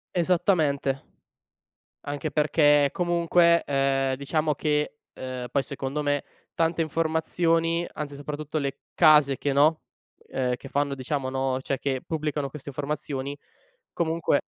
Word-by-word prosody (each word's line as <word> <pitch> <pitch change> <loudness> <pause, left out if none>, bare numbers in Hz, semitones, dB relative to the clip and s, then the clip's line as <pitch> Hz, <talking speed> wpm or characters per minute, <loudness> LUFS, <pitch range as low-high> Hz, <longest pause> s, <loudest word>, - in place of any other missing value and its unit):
Esattamente, 160 -6 +1 1.0
anche 145 +2 -3
perché 145 -1 +4
comunque, 170 -1 +3
ehm, 135 -1 +1
diciamo 150 +2 0
che, 150 0 -1 0.2
uhm, 130 -1 -5
poi 140 - +2
secondo 140 +1 -4
me 145 -1 0 0.3
tante 165 0 +1
informazioni, 165 +1 +1
anzi 145 -2 -6
soprattutto 150 +2 -5
le 140 -1 -3
case 150 -4 +6
che 145 - -1
no, 150 +3 +3 0.5
ehm, 125 -1 -1
che 135 - -11
fanno 140 0 0
diciamo 135 0 -3
no, 130 0 -1
cioè 135 0 -2
che 135 -2 -2
pubblicano 150 -3 -2
queste 140 0 -8
informazioni, 140 0 -4 0.5
comunque 165 -3 +1
145 Hz, 125 wpm, -26 LUFS, 135-160 Hz, 1.0 s, case